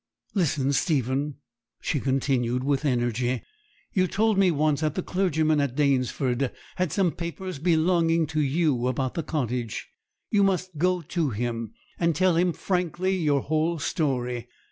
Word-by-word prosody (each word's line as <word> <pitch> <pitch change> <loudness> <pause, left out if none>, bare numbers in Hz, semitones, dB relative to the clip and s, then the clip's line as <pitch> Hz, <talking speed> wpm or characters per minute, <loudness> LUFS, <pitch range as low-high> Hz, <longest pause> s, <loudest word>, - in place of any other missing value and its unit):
'Listen, 145 -7 +1
Stephen,' 140 -1 0 0.4
she 145 - -1
continued, 130 -2 0
with 140 +1 0
energy: 120 -1 0 0.5
'you 185 -1 +3
told 215 +4 +2
me 195 -1 +4
once 155 -2 +1
that 155 -2 0
the 185 - -1
clergyman 160 -5 +1
at 140 -3 -1
Danesford 135 -2 +1 0.3
has 180 -4 0
some 190 -4 +2
paper 175 +3 -5
belonging 165 0 +3
to 155 0 -1
you, 140 -4 +1
about 130 0 -1
the 165 - -2
cottage. 125 -7 -3 0.4
You 205 - +4
must 185 -4 0
go 180 +1 +2
to 160 -1 -1
him, 115 -1 -3 0.3
and 170 -2 +2
tell 185 +1 +3
him 175 +1 +3
frankly 180 +1 -1
your 150 -6 +2
whole 160 +4 0
story. 125 -6 -1
150 Hz, 145 wpm, -26 LUFS, 130-175 Hz, 0.5 s, me